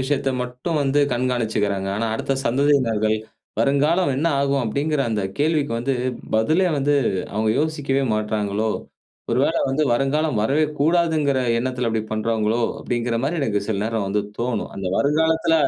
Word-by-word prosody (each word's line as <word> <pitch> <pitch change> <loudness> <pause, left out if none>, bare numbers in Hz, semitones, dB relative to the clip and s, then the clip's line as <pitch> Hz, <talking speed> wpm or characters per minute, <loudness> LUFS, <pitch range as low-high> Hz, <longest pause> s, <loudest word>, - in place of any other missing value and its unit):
விஷயத்த 135 0 0
மட்டும் 125 +6 -3
வந்து 140 +1 +2
கண்காணிச்சிக்கிறாங்க. 110 -6 0
ஆனா, 115 +1 -1
அடுத்த 135 - -1
சந்ததியினர்கள், 115 -5 +2 0.4
வருங்காலம் 140 +6 +2
என்ன 155 - 0
ஆகும்? 140 -1 +1
அப்படிங்கிற 145 +6 -1
அந்த 105 -2 -1 0.2
கேள்விக்கு 150 -4 +1
வந்து 135 +3 -1 0.4
பதிலே 155 +12 +3
வந்து, 145 +1 +2 0.4
அவங்க 110 +1 0
யோசிக்கவே 145 -3 0
மாட்டிறாங்களோ? 105 0 -1 0.6
ஒருவேள - - +2
வந்து 140 +3 +1
வருங்காலம் 135 +1 +1
வரவே 140 +8 +2
கூடாதுங்கிற 155 -3 +2 0.2
எண்ணத்தில 125 0 -2
அப்படி 110 -1 -1
பண்றாங்களோ? 110 +1 0 0.2
அப்படிங்கிற 120 -1 -2
மாரி 160 +5 -1
எனக்கு 105 -6 0
சில 105 -3 -1
நேர 115 +1 -3
வந்து 105 +2 0 0.2
தோணும். 120 -2 -2
அந்த 95 -1 -5
வருங்காலத்தில 160 +3 +2
130 Hz, 140 wpm, -22 LUFS, 110-145 Hz, 0.6 s, பதிலே